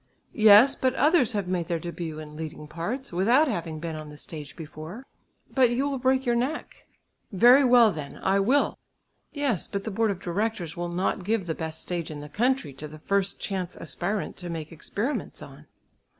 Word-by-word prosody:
"Yes, 220 +4 +7
but 260 0 0
others 300 -5 +4
have 200 -3 -1
made 180 -2 -1
their 170 -2 -1
début 165 -2 -5
in 150 -1 -9
leading 150 -1 -7
parts, 180 - -5
without 235 - +4
having 170 - -3
been 165 0 -4
on 155 -1 -7
the 150 - -11
stage 150 -2 -9
before." 160 - -9 0.5
"But 255 -3 +5
you 255 +4 0
will 275 -2 -2
break 260 +1 +2
your 240 - +2
neck." 255 +7 -3 0.4
"Very 245 +7 +7
well, 245 -4 +6
then! 150 -4 -7
I 195 +1 +3
will!" 255 +9 +2 0.5
"Yes, 280 - -1
but 200 0 -4
the 220 - -4
board 225 +2 +1
of 195 -3 -2
directors 190 -1 -2
will 175 0 -3
not 180 +2 -1
give 210 0 0
the 165 - -2
best 160 0 -5
stage 175 -2 -4
in 150 -2 -6
the 150 0 -9
country 240 - 0
to 150 +3 -7
the 155 +1 -11
first 195 +4 -1
chance 185 -3 -4
aspirant 200 +3 -3
to 180 -1 -7
make 160 -2 -5
experiments 205 - -4
on." - - -13
190 Hz, 195 wpm, -26 LUFS, 160-240 Hz, 0.5 s, Yes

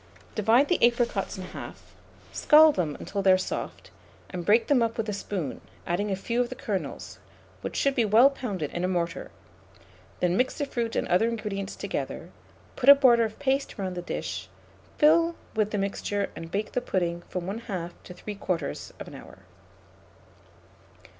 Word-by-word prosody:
Divide 230 +6 +4
the 355 - +1
apricots 235 -5 +1
in 185 - -6
half, 185 - -10 0.4
scald 310 0 +6
them 160 - -1
until 200 - -3
they 190 -1 +5
are 185 - +6
soft, 185 - -5 0.4
and 180 -2 -4
break 215 +6 +4
them 275 -4 +3
up 230 0 0
with 225 -1 -2
a - - -1
spoon, 190 -7 -4 0.2
adding 195 +5 -1
a 195 - 0
few 235 +5 -1
of 245 - -1
the 255 - -6
kernels, 205 -6 -5 0.4
which - - -5
should 275 - +2
be 245 - +2
well 225 +6 +6
pounded 200 - -4
in 175 - -3
a - - +2
mortar; 175 -2 -2 0.9
then 180 0 +1
mix 255 +4 +1
the 290 - -1
fruit 235 -4 -3
and - - 0
other 185 +6 +3
ingredients 205 -4 -4
together, - - -5 0.4
put 265 +1 +3
a 280 - +12
border 240 -4 +5
of 215 -1 -6
paste 275 0 -1
round 190 -2 -3
the 175 - -3
dish, 175 - -5 0.5
fill 330 +2 +4 0.2
with 215 -1 +1
the 210 - -2
mixture, 200 0 -2
and 165 - -7
bake 205 +4 -2
the 250 - -1
pudding 175 -6 -1
from 180 - -3
1/2 195 -4 -4
to 180 - -10
3/4 180 -5 -5
hour. - - -12
210 Hz, 175 wpm, -27 LUFS, 185-245 Hz, 0.9 s, a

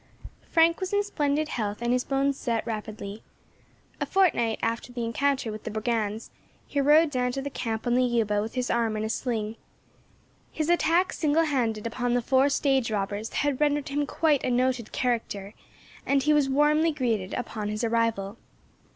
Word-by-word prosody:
FRANK 330 0 +4
was 375 0 -4
in 405 0 +3
splendid 300 -6 0
health, 210 -3 -2
and 240 +1 0
his 250 0 +1
bones 275 0 0
set 235 -4 -2
rapidly. 215 -2 -6 0.8
A - - -2
fortnight 300 - +2
after 230 +2 -2
the 240 -1 -3
encounter 260 0 0
with 215 0 -8
the - - -4
brigands 220 0 -2 0.3
he 285 - -1
rode 300 +2 +5
down 250 -2 0
to 270 - -3
the 285 - -4
camp 225 -3 -3
on 240 - +1
the 255 +1 +3
Yuba 225 -4 +1
with 220 +3 -5
his 250 -1 -1
arm 230 -2 0
in 215 - -2
a 220 - -2
sling. 225 -2 -2 0.9
His 310 0 -2
attack 345 +1 +3
single 310 +1 +2
handed 230 -8 -1
upon 245 +1 -1
the 245 - +2
four 265 +3 +3
stage 270 -4 +1
robbers 205 +1 -3
had 290 -1 -1
rendered 290 -1 +1
him 290 +1 -1
quite 305 -4 +1
a - - 0
noted 250 -2 0
character, 220 -5 -2 0.5
and 275 -1 +1
he 300 +2 +3
was 290 -2 +3
warmly 300 +4 +3
greeted 230 -10 -1
upon 215 -3 -4
his 215 +2 -3
arrival. 230 -3 0
245 Hz, 180 wpm, -26 LUFS, 225-285 Hz, 0.9 s, rode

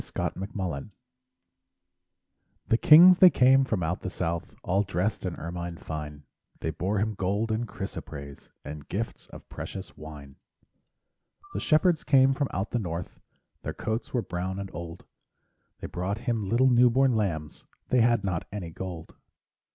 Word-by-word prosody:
Christmas 95 +2 -4
Carol 85 -8 -3 1.8
The 115 - +4
kings 175 +4 +8
they 185 - +10
came 135 -2 +5
from 110 -9 -1
out 80 +3 -2
the - - -4
south, 85 -2 -3
All 95 +3 +2
dressed 95 +1 -1
in 90 - -4
ermine 85 +1 -5
fine, 75 -2 -7 0.4
They 80 - -2
bore 95 +6 -2
Him 110 +2 0
gold 100 +3 -1
and 115 +2 -1
chrysoprase, 70 -9 -8 0.2
And 75 -1 -8
gifts 110 +5 -4
of - - -13
precious 95 - -8
wine. 75 -3 -11 1.2
The - - -2
shepherds 155 +1 +3
came 135 -2 +5
from 140 0 -1
out 95 +3 -3
the 120 - 0
north, 85 -3 -5 0.4
Their - - -5
coats 110 +2 -3
were 120 -3 0
brown 90 +2 -4
and 100 -1 -6
old, 85 0 -8 0.8
They - - -5
brought 95 +4 -3
Him 115 -4 -2
little 130 +3 +4
new 125 0 +6
born 130 +1 +3
lambs 80 -8 -2 0.2
They 125 - +4
had 115 -2 +3
not 90 -4 -2
any 95 -5 -5
gold. 85 -1 -7
95 Hz, 155 wpm, -27 LUFS, 85-120 Hz, 1.8 s, they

